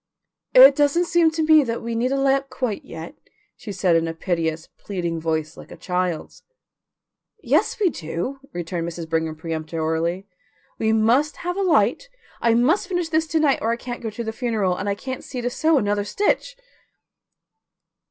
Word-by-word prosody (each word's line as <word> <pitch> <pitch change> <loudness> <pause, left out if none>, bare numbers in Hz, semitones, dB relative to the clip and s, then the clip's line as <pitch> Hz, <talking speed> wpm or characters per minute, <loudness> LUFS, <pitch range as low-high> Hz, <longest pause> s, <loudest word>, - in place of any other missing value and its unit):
"It - - +10
doesn't 295 +4 +2
seem 340 -1 +3
to 320 0 -2
me 310 -1 +6
that 230 -3 -4
we 235 0 -3
need 240 +3 0
a 275 - +1
lamp 275 0 +1
quite 250 -5 -3
yet," 165 +1 -9 0.4
she 210 - -8
said 185 -3 +2
in 165 0 +2
a 165 - -4
piteous, 165 -2 -2
pleading 175 -4 -3
voice 160 -1 -2
like - - -13
a - - -10
child's. 180 -3 -3 1.0
"Yes, - - +1
we 385 -5 +3
do," 175 - -5
returned 170 -1 -4
Mrs. 170 -1 -7
Brigham 160 -1 -1
peremptorily. 160 +2 -2 0.5
"We 220 0 +1
must 235 +7 +2
have 355 0 -1
a 395 - -1
light. 385 +7 +2 0.3
I 230 -1 +3
must 310 - +2
finish 355 -3 -2
this 320 0 +1
to 320 0 0
night 295 -3 +3
or 225 - 0
I 230 - +2
can't 245 0 -7
go 225 - -3
to 220 +2 -6
the 220 -1 -4
funeral, 220 -7 0
and 200 - -3
I 200 - 0
can't 260 +4 -6
see 255 - -6
to 245 0 -2
sew 315 +4 +2
another 205 -3 0
stitch." 415 - -1
225 Hz, 180 wpm, -22 LUFS, -, 1.0 s, It